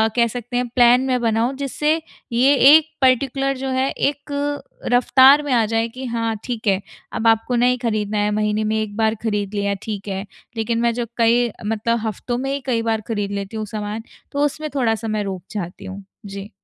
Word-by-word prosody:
कह 235 Hz, -1 st, +4 dB
सकते 245 Hz, +1 st, -5 dB
हैं 250 Hz, 0 st, 0 dB
प्लान 245 Hz, 0 st, +6 dB
मैं 255 Hz, -1 st, +1 dB
बनाऊँ, 230 Hz, +2 st, +1 dB
जिससे 295 Hz, +3 st, 0 dB, 0.4 s
ये 255 Hz, +4 st, +4 dB, 0.2 s
एक 315 Hz, 0 st, +4 dB
पर्टिकुलर 270 Hz, +1 st, +2 dB
जो 265 Hz, +1 st, -4 dB
है 260 Hz, +1 st, +1 dB
एक 285 Hz, +1 st, -2 dB
अ, 285 Hz, 0 st, -4 dB
रफ़्तार 265 Hz, +3 st, +6 dB
में 290 Hz, -, -3 dB
आ 230 Hz, -2 st, +3 dB
जाए 225 Hz, +1 st, 0 dB
कि 255 Hz, +3 st, -8 dB
हाँ 230 Hz, -2 st, -1 dB
ठीक 235 Hz, -3 st, -4 dB
है 195 Hz, 0 st, +2 dB, 0.3 s
अब 225 Hz, -, 0 dB
आपको 225 Hz, +2 st, +2 dB
नहीं 250 Hz, +1 st, +3 dB
खरीदना 215 Hz, -3 st, -1 dB
है, 210 Hz, 0 st, +1 dB
महीने 210 Hz, 0 st, 0 dB
में 215 Hz, 0 st, 0 dB
1 205 Hz, -1 st, -5 dB
बार 220 Hz, 0 st, +2 dB
खरीद 210 Hz, -2 st, -2 dB
लिया 200 Hz, -1 st, 0 dB
ठीक 210 Hz, -2 st, -5 dB
है। 195 Hz, 0 st, -3 dB, 0.3 s
लेकिन 230 Hz, +1 st, -1 dB
मैं 235 Hz, -1 st, +2 dB
जो 240 Hz, 0 st, -2 dB
कई 235 Hz, +1 st, +3 dB, 0.2 s
मतलब 225 Hz, +2 st, 0 dB
हफ़्तों 240 Hz, +3 st, -3 dB
में 270 Hz, +2 st, -2 dB
ही 280 Hz, -, -2 dB
कई 235 Hz, -4 st, 0 dB
बार 225 Hz, -1 st, -1 dB
खरीद 205 Hz, -3 st, -2 dB
लेती 200 Hz, +2 st, -4 dB
हूँ 215 Hz, -, -3 dB
सामान, 210 Hz, +1 st, -5 dB, 0.3 s
तो 285 Hz, +1 st, +1 dB
उसमें 305 Hz, +1 st, -3 dB
थोड़ा-सा 225 Hz, -4 st, 0 dB
मैं 215 Hz, -1 st, -1 dB
रोक 190 Hz, -3 st, -5 dB
चाहती 195 Hz, -1 st, -6 dB
हूँ। 195 Hz, +1 st, -8 dB, 0.2 s
जी। 200 Hz, 0 st, -7 dB
230 Hz, 205 wpm, -21 LUFS, 210-255 Hz, 0.4 s, प्लान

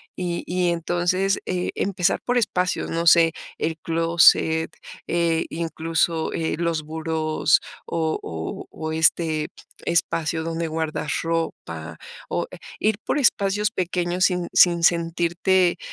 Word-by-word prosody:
Y 175 Hz, -2 st, -3 dB
y, 180 Hz, 0 st, 0 dB
entonces, 175 Hz, +3 st, 0 dB
eh, 180 Hz, -1 st, -1 dB
empezar 190 Hz, -1 st, 0 dB
por 245 Hz, 0 st, 0 dB
espacios, 185 Hz, -5 st, 0 dB
no 165 Hz, +1 st, -1 dB
sé, 165 Hz, -1 st, +7 dB, 0.3 s
el 160 Hz, 0 st, -2 dB
clóset, 165 Hz, 0 st, +3 dB, 0.4 s
eh, 170 Hz, -1 st, +1 dB
incluso, 165 Hz, 0 st, -1 dB
eh, 160 Hz, -1 st, -1 dB
los 165 Hz, -2 st, -1 dB
burós 155 Hz, 0 st, +1 dB, 0.3 s
o 160 Hz, -1 st, -1 dB
o 80 Hz, -1 st, -6 dB
o 160 Hz, 0 st, -5 dB
este 160 Hz, -1 st, +2 dB, 0.4 s
espacio 165 Hz, -1 st, 0 dB
donde 165 Hz, 0 st, -2 dB
guardas 160 Hz, -1 st, -3 dB
ropa 85 Hz, -, -4 dB, 0.3 s
o -, -, -2 dB
e -, -, -9 dB, 0.2 s
ir 215 Hz, -1 st, +1 dB
por -, -, 0 dB
espacios 210 Hz, -4 st, +2 dB
pequeños 180 Hz, -2 st, 0 dB
sin 180 Hz, -2 st, 0 dB
sin 170 Hz, -1 st, +5 dB
sentirte, 175 Hz, +2 st, +2 dB
170 Hz, 125 wpm, -23 LUFS, 160-180 Hz, 0.4 s, sé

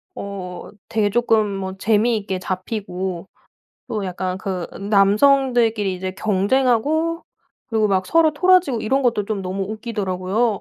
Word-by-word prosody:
어 185 Hz, -3 st, -7 dB, 0.2 s
되게 215 Hz, -2 st, +1 dB
쪼끔 225 Hz, -1 st, +2 dB
뭐 190 Hz, -1 st, -5 dB
재미있게 210 Hz, -2 st, +1 dB
잡히고 185 Hz, -1 st, -4 dB, 0.6 s
또 210 Hz, -3 st, -3 dB
약간 185 Hz, 0 st, -3 dB
그 185 Hz, -2 st, -4 dB, 0.2 s
남성들끼리 220 Hz, 0 st, +3 dB
이제 185 Hz, +1 st, -4 dB
경쟁하고 260 Hz, -, +1 dB, 0.4 s
그리고 220 Hz, -3 st, +1 dB
막 185 Hz, -1 st, +1 dB
서로 325 Hz, -1 st, +4 dB
토라지고 345 Hz, -7 st, +3 dB
이런 270 Hz, +5 st, +1 dB
것도 235 Hz, -5 st, +1 dB
좀 200 Hz, -2 st, -3 dB
너무 190 Hz, +1 st, -3 dB
웃기더라고요. 210 Hz, -1 st, -1 dB
210 Hz, 290 characters per minute, -21 LUFS, 190-240 Hz, 0.6 s, 서로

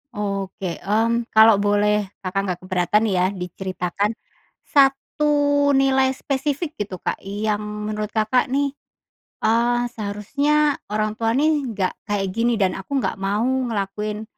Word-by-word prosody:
Oke. 195 Hz, -3 st, -3 dB
Mmm, 230 Hz, +4 st, +1 dB
kalau 220 Hz, -2 st, +7 dB
boleh 205 Hz, 0 st, +2 dB, 0.2 s
Kakak 190 Hz, +1 st, -1 dB
nggak 180 Hz, -2 st, -3 dB
keberatan, 185 Hz, +3 st, +1 dB
ya, 180 Hz, -1 st, +2 dB
diceritakan 185 Hz, +3 st, -3 dB, 0.5 s
1 275 Hz, +2 st, +2 dB, 0.5 s
nilai 265 Hz, -1 st, +3 dB
spesifik, 285 Hz, +4 st, -2 dB
gitu, 205 Hz, -2 st, -3 dB
Kak, -, -, -2 dB
yang 205 Hz, +1 st, -2 dB
menurut 210 Hz, 0 st, -4 dB
Kakak, 220 Hz, +5 st, +2 dB
nih, 280 Hz, +2 st, 0 dB, 0.7 s
eee, 235 Hz, +2 st, +3 dB, 0.2 s
seharusnya 280 Hz, +9 st, +1 dB, 0.2 s
orang 215 Hz, 0 st, -1 dB
tua, 225 Hz, 0 st, 0 dB
nih, 300 Hz, 0 st, +2 dB
nggak 195 Hz, -4 st, -1 dB
kayak 205 Hz, -2 st, -1 dB
gini, 235 Hz, 0 st, +2 dB
dan 190 Hz, -2 st, +2 dB
aku 195 Hz, +8 st, -9 dB
nggak -, -, -1 dB
mau 200 Hz, +3 st, 0 dB
ngelakuin 215 Hz, -4 st, -2 dB
210 Hz, 130 wpm, -22 LUFS, 200-255 Hz, 0.7 s, kalau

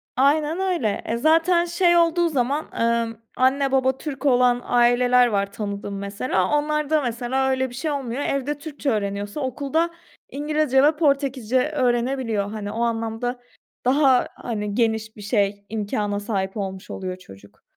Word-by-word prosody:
Aynen 300 Hz, +5 st, +2 dB
öyle. 350 Hz, -, -1 dB
Eee, 230 Hz, -, -1 dB
zaten 330 Hz, +5 st, +3 dB
şey 345 Hz, 0 st, +3 dB
olduğu 340 Hz, 0 st, +3 dB
zaman, 280 Hz, +1 st, 0 dB, 0.2 s
ımm, 230 Hz, -1 st, 0 dB, 0.2 s
anne, 270 Hz, +1 st, +2 dB
baba 265 Hz, 0 st, +2 dB
Türk 285 Hz, -1 st, -6 dB
olan 250 Hz, -2 st, +4 dB
aileler 245 Hz, +1 st, +4 dB
var 200 Hz, -3 st, -1 dB
tanıdığım, 200 Hz, -1 st, -5 dB
mesela. 200 Hz, -1 st, -1 dB
Onlarda, 300 Hz, +1 st, 0 dB
mesela, 255 Hz, +2 st, -1 dB
öyle 260 Hz, 0 st, 0 dB
bir 245 Hz, -, -11 dB
şey 305 Hz, +4 st, -2 dB
olmuyor. 270 Hz, -2 st, -3 dB
Evde 275 Hz, +1 st, -1 dB
Türkçe 290 Hz, -1 st, -4 dB
öğreniyorsa 205 Hz, +1 st, -2 dB
okulda 285 Hz, +5 st, -1 dB, 0.4 s
İngilizce 295 Hz, -2 st, +1 dB
ve 300 Hz, +2 st, +4 dB
Portekizce 270 Hz, -5 st, +1 dB
öğrenebiliyor. 240 Hz, -6 st, 0 dB
Hani, 210 Hz, -2 st, -5 dB
o 225 Hz, +2 st, -3 dB
anlamda 230 Hz, +1 st, -2 dB, 0.5 s
daha, 265 Hz, -1 st, +4 dB
hani, 210 Hz, -3 st, -4 dB
geniş 220 Hz, -1 st, 0 dB
bir 210 Hz, -, -11 dB
şey, 200 Hz, -1 st, 0 dB
imkâna 205 Hz, -1 st, -2 dB
sahip 200 Hz, -2 st, -3 dB
olmuş 190 Hz, -2 st, -5 dB
oluyor 185 Hz, -1 st, -5 dB
çocuk. 100 Hz, -, -16 dB
250 Hz, 145 wpm, -23 LUFS, 215-285 Hz, 0.5 s, olan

